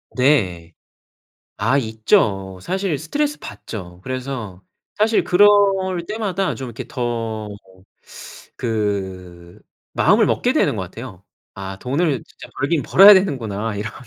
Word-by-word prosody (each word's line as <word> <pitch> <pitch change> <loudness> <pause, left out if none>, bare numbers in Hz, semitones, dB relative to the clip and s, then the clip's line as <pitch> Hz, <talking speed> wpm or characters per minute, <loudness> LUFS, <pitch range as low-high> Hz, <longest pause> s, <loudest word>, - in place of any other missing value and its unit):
네. 95 - +1 0.9
아 115 +7 +2
있죠. 110 -5 0
사실 190 - -2
스트레스 290 - -2
받죠. 90 -5 -9
그래서 125 -7 -6 0.3
사실 220 +1 +2
그럴 195 +3 +5 0.6
때마다 195 -3 -2
좀 135 - -7
이렇게 120 +2 -7
더 115 -3 -3 1.1
그 95 -6 -4 0.3
마음을 - - +3
먹게 - - +1
되는 - - +2
거 - - -3
같아요. 95 0 -10 0.3
'아 95 0 -7
돈을 140 - -1
진짜 - - -14
벌긴 145 +2 0
벌어야 200 +2 +8
되는구나.' 115 - -1
이런. 105 +2 -4
115 Hz, 235 characters per minute, -20 LUFS, 95-150 Hz, 1.1 s, 벌어야